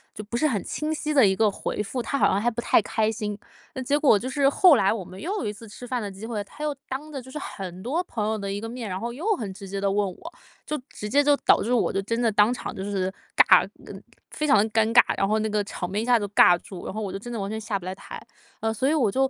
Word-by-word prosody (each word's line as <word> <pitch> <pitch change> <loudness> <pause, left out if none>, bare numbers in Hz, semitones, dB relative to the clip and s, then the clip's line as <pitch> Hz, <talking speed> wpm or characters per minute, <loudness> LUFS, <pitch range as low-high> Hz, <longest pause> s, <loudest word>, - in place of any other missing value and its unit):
就 215 - -7
不 220 +3 -4
是 310 - +2
很 215 -7 -1
清 305 +1 -2
晰 305 0 -2
的 265 -8 +6
一 190 - +3
个 220 0 +3
回 205 - -3
复， 230 +5 -4
他 280 - -2
好 - - +4
像 200 - +1
还 240 - +1
不 235 - -4
太 - - +4
开 215 +1 0
心。 210 -2 -4 0.4
嗯， 260 -1 -4
结 290 +3 +2
果 270 -9 +5
就 255 +5 -5
是 275 0 +3
后 320 0 +6
来 195 - +3
我 205 -5 -4
们 185 - -11
又 345 - -4
有 - - -3
一 210 - -2
次 215 +1 -12
吃 245 +4 -10
饭 250 0 -2
的 205 -2 -4
机 195 +2 -10
会， 215 -3 -3
他 295 - -12
又 300 -1 -1
当 295 +4 -6
着 270 - -4
就 260 - -13
是 300 - -5
很 185 -9 -7
多 295 - -1
朋 215 -10 -3
友 220 0 -1
的 200 -1 -4
一 200 +1 -3
个 225 - -5
面， 235 -2 -6
然 185 0 -3
后 235 +2 -4
又 315 - -6
很 205 - -5
直 195 0 -10
接 195 +1 -4
地 195 0 +1
问 205 0 +1
我， 325 - -11 0.3
就 300 -2 -3
直 210 - -7
接 285 +7 +4
就 290 0 +4
导 - - +4
致 235 - -1
我 245 - +2
就 195 - 0
真 230 +4 -2
的 235 -2 +2
当 210 +4 +4
场 - - -6
就 190 - -6
是 190 -2 -2 0.2
尬， - - +6 0.2
呃， - - -9 0.4
非 305 - -2
常 270 - +5
地 205 - +4
尴 220 0 +2
尬， 245 - +9 0.2
然 195 - +2
后 215 +1 +2
那 220 - -1
个 210 0 +1
场 185 -2 -5
面 205 - -1
一 225 - -2
下 245 -2 +5
子 205 - -3
就 200 - -17
尬 175 -3 +6
住， 185 -3 -9
然 - - -5
后 220 - -3
我 200 - -4
就 195 - -4
真 240 +4 -9
的 235 - -4
完 200 0 -3
全 220 0 -4
下 215 -2 -2
不 180 - -13
来 185 - -4
台。 - - -9 0.4
呃， 220 0 0
所 240 +5 0
以 305 - +2
我 250 -9 +2
就 265 0 +2
220 Hz, 340 characters per minute, -25 LUFS, 200-260 Hz, 0.4 s, 尬